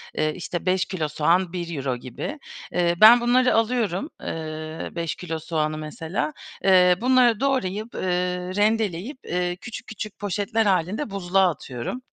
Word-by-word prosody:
eee, 155 0 0
işte, 175 0 -5
5 185 0 +2
kilo 165 -5 -2
soğan 170 +4 +1
€1 160 -8 -3
gibi. 130 - -6 0.3
Eee, 175 -1 +2
ben 235 +3 +9
bunları 250 +1 +3
alıyorum, 225 - 0
eee, 155 0 -5
5 170 -2 -2
kilo 165 -3 -5
soğanı 155 -1 -2
mesela. 160 - -3 0.3
Eee, 180 -2 +6
bunları 250 -3 +4
doğrayıp, 235 -5 -1
eee, - - -4 0.5
rendeleyip, 215 - 0
eee, 175 0 -1
küçük 225 +5 -9
küçük 215 -1 -7
poşetler 205 +3 0
hâlinde 195 - 0
buzluğa 190 -1 +2
atıyorum. 135 - -5
185 Hz, 140 wpm, -24 LUFS, 165-220 Hz, 0.5 s, ben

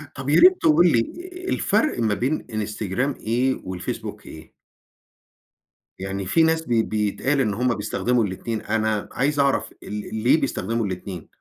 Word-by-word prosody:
طَب 130 +2 -5
يا 150 - +5
ريت 370 0 +7
تقول 165 +2 +5
لي 115 - +4 0.5
الفرق 310 - +1
ما 110 -2 +1
بين 130 +8 -1
إنستجرام 110 +5 -2
إيه 125 +4 +1
والفيسبوك 90 -1 -6
إيه؟ 80 0 -12 1.5
يعني 95 0 -4
في 160 - +3
ناس 160 0 +2
ب - - -11
بيتقال 110 +5 +1
إن 105 -5 0
هم 125 +2 0
بيستخدموا 125 -2 0
الاتنين، 105 +3 -3
أنا 110 -2 -1
عايز 145 +3 0
أعرف 140 -1 +1
ال 105 +1 -6
ليه 135 +6 +4
بيستخدموا 115 +3 -1
الاتنين؟ 90 -2 -6
115 Hz, 145 wpm, -23 LUFS, 105-135 Hz, 1.5 s, ريت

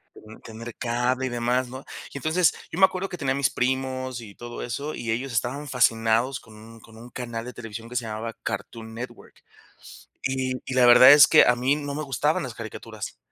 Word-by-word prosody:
mm, 110 +1 -14
tener 115 +1 -9
cable, 125 +2 -1
y - - -3
demás, 120 +1 0
¿no? 130 +2 -9 0.3
Y - - -5
entonces, 160 +5 +2 0.2
yo 165 - -5
me 190 - +9
acuerdo 190 0 -3
que 180 - -6
tenía 135 -5 -1
a - - -3
mis 140 -1 +2
primos 130 -1 -2
y 100 -3 -12
todo 120 0 -8
eso, 140 +6 -4
y 115 -1 -3
ellos 130 +4 -2
estaban 125 +6 -2
fascinados 115 0 +2
con 110 -1 -16
un 115 +1 -14
con 110 0 -16
un 120 +2 -12
canal 120 -2 -5
de 125 - -8
televisión 115 -1 -8
que 125 - -10
se 120 -1 -1
llamaba 110 +1 -5
Cartoon 110 -1 -5
Network. 120 +3 -9 0.8
Y 130 -1 -1
y 130 - -5
la 130 -1 +5
verdad 125 +2 +9
es 145 -1 +9
que - - +7
a 125 - +4
mí 130 +4 +1
no 145 -1 -5
me 155 - -3
gustaban 135 -7 0
las - - -6
caricaturas. - - -8
125 Hz, 215 wpm, -25 LUFS, 115-130 Hz, 0.8 s, me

